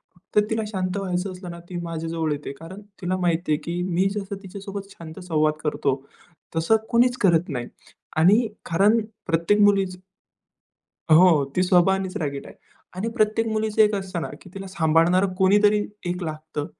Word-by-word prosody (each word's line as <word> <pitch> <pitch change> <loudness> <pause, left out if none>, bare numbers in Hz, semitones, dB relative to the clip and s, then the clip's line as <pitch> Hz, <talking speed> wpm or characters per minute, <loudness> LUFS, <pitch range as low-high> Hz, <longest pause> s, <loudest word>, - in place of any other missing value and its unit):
फक्त 190 +4 -1
तिला 220 0 0
शांत 185 -2 -2
व्हायचं 185 -1 -2
असलं 180 -1 -9
ना, 170 - -9
ती 180 - -7
माझ्याजवळ 165 -1 -3
येते. 145 -1 -4
कारण 185 +5 -10 0.2
तिला 185 +1 -1
माहिती 175 -2 0
आहे, 150 - +3
की 175 +1 -3
मी 180 +3 +2
जसं 200 -1 -4
तिच्यासोबत 195 +1 -7
शांत 165 -2 -10
संवाद 155 -3 +1
करतो 140 -3 -1 0.5
तसं 165 +7 +3
कोणीच 245 +1 +3
करत 175 -3 +3
नाही. 125 -4 -4 0.5
आणि 205 +9 +5 0.2
कारण 205 +7 +3 0.3
प्रत्येक 170 +6 +2
मुलीच 195 -2 +3 1.2
हो, 165 -4 +6
ती 185 - +3
स्वभावानेच 185 +1 +2
रागीट 140 -6 -3
आहे. - - -12 0.4
आणि 205 +5 -2
प्रत्येक 220 -1 +1
मुलीचं 220 0 +2
एक 210 0 +3
असतं 190 -3 -3
ना, - - -4
की 185 - -14
तिला 195 0 -7
सांभाळणारं 170 +2 +2
कोणीतरी 205 +2 +4 0.3
एक 180 +1 -2
लागतं, 155 -2 -5
185 Hz, 160 wpm, -24 LUFS, 165-200 Hz, 1.2 s, हो